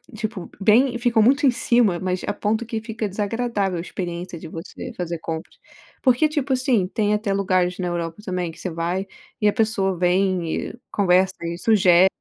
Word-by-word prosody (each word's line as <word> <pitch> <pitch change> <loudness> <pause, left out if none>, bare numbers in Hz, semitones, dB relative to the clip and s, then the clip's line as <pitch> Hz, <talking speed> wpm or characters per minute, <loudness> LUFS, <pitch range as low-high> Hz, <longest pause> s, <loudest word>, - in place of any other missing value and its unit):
tipo, 215 -4 -5
bem 240 +4 +4
ficam 240 -2 +2
muito 275 +5 +4
em 260 - +6
cima, 235 -7 +2
mas 185 -1 -2
a - - 0
ponto 220 +3 -1
que 225 -1 -3
fica 225 -1 -4
desagradável 205 -2 -1
a - - -2
experiência 175 -1 -5
de 165 - -9
você 165 +3 -8
fazer 170 -2 -4
compras 160 +1 -6 0.5
porque, 260 +4 +3
tipo 285 -3 -1
assim, 250 -7 +2
tem 210 0 0
até 210 -1 0
lugares 185 -2 +1
na 180 -1 -2
Europa 170 0 -3
também, 180 -3 -2
que 160 - -12
você 185 - -3
vai 170 +4 -2 0.4
e 210 - +4
a - - -1
pessoa 195 -5 +1
vem 180 -2 +1
e 240 - -12
conversa 190 -1 +3
e 170 0 -3
sugere. 185 -3 +5
195 Hz, 185 wpm, -22 LUFS, 180-225 Hz, 0.5 s, em